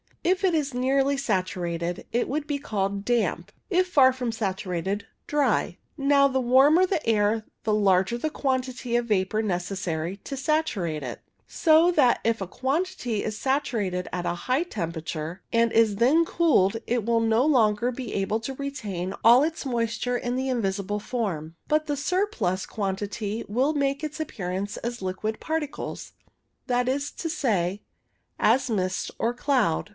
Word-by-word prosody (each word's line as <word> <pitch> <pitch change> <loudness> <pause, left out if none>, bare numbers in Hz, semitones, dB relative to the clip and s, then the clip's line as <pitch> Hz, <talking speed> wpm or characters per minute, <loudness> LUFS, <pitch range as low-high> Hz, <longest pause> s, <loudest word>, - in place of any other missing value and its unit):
If 370 +3 +1
it 370 -3 +3
is 290 -3 -1
nearly 270 +2 +2
saturated 180 -7 -2
it 240 - 0
would 295 +2 -2
be 290 - -1
called 200 -4 -2
damp; 210 -5 0 0.2
if 370 -1 +2
far 275 -7 +6
from 250 -2 -2
saturated, 195 -2 -2 0.2
dry. 295 -1 +1 0.2
Now, 280 -1 +4
the 265 -1 0
warmer 270 +8 +5
the 365 -4 -2
air 215 0 +2 0.2
the 215 - +1
larger 195 +1 +3
the 310 +6 -2
quantity 255 -4 -2
of 240 0 +1
vapour 210 0 +1
necessary 180 -3 -2
to 275 +7 -7
saturate 255 - 0
it, 125 - -6 0.3
so 325 +2 +4
that 270 -8 +4
if 230 0 +1
a 195 - -3
quantity 265 - -2
is 215 -1 -3
saturated 215 -10 -1
at 180 -1 -3
a - - 0
high 255 +4 +2
temperature, 165 - -5
and 230 -1 +3
is 225 -3 +4
then 265 +10 +4
cooled, 260 - +3
it 240 -1 0
will 230 0 +2
no 225 +1 +3
longer 235 -5 +3
be 250 -2 -6
able 200 +3 0
to 265 +4 -4
retain 210 -10 -4
all 240 +4 +7
its 320 -1 -2
moisture 240 0 -1
in 245 0 -2
the 260 +1 -1
invisible 205 -4 -1
form, 190 -9 -3
but 305 0 +2
the 290 -1 -1
surplus 360 - 0
quantity 205 +2 -3
will 255 +8 +1
make 280 0 0
its 305 +1 -4
appearance 195 -8 -4
as 240 -1 -5
liquid 190 +4 -3
particles, 315 -2 -4 0.5
that 245 -1 +1
is 280 +2 -1
to 330 - -5
say, 205 - 0 0.6
as 250 +4 +3
mist 185 -4 -1
or 235 - 0
cloud. 245 - +1
235 Hz, 160 wpm, -26 LUFS, 195-275 Hz, 0.6 s, all